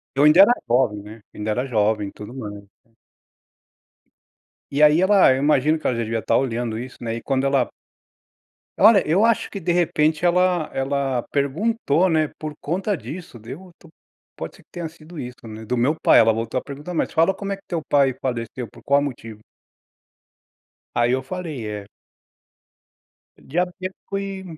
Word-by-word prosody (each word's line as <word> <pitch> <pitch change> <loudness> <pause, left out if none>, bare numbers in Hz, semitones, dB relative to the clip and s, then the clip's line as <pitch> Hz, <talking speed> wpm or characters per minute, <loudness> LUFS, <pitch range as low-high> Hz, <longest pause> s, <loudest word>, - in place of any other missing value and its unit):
Eu 140 - +2
ainda 155 +5 +7
era 205 +5 +8 0.2
jovem, 120 -4 +2
né. 105 +2 -11
Ainda 105 +1 -3
era 125 +5 -1
jovem, 105 -4 +1
e - - -11
tudo 105 +2 -10
mais. 105 -5 -7 2.1
E 140 +2 +1
aí 150 +2 +6
ela, 195 -3 +6
eu 130 - 0
imagino 150 +2 +2
que - - -6
ela 125 - +1
já 115 - -1
devia 115 0 -2
estar - - +1
olhando 120 -3 -1
isso, 125 +2 -8
né, 115 -1 -3
e 115 - -7
quando 135 0 0
ela 135 -2 +3 1.1
Olha, 205 -1 +6
eu 185 +8 +3
acho 230 -1 +2
que, 200 - -6
de 175 0 -2
repente, 160 -2 +1
ela 180 -2 +2
ela 135 -2 -1
perguntou, 165 - +1
né, 155 -1 +2
por 155 -1 -5
conta 190 +6 -1
disso, 170 -5 -9
deu 145 - -10
tô 170 - -17 0.5
pode - - -7
ser - - -19
que - - -73
tenha 170 -2 -5
sido 160 +1 -15
isso, 125 -3 -6
né, 110 0 -8
do 125 +3 -2
meu 125 +6 +2
pai, - - +6
ela 115 0 +6
voltou 115 +2 -2
a - - -5
perguntar: 145 +5 -8
"Mas - - -1
fala 165 +3 +3
como 200 +1 -5
é 195 - -2
que 195 - -21
teu 170 -3 -2
pai 140 -2 +4
faleceu? 120 -1 -4
Por - - -17
qual 140 +1 +3
motivo?". 115 -6 -6 1.6
Aí 120 0 +3
eu 130 - 0
falei, 155 -8 -5
é 105 -1 -6 1.5
diabético, 185 +4 -4
e 195 -1 -5
140 Hz, 180 wpm, -22 LUFS, 120-175 Hz, 2.1 s, era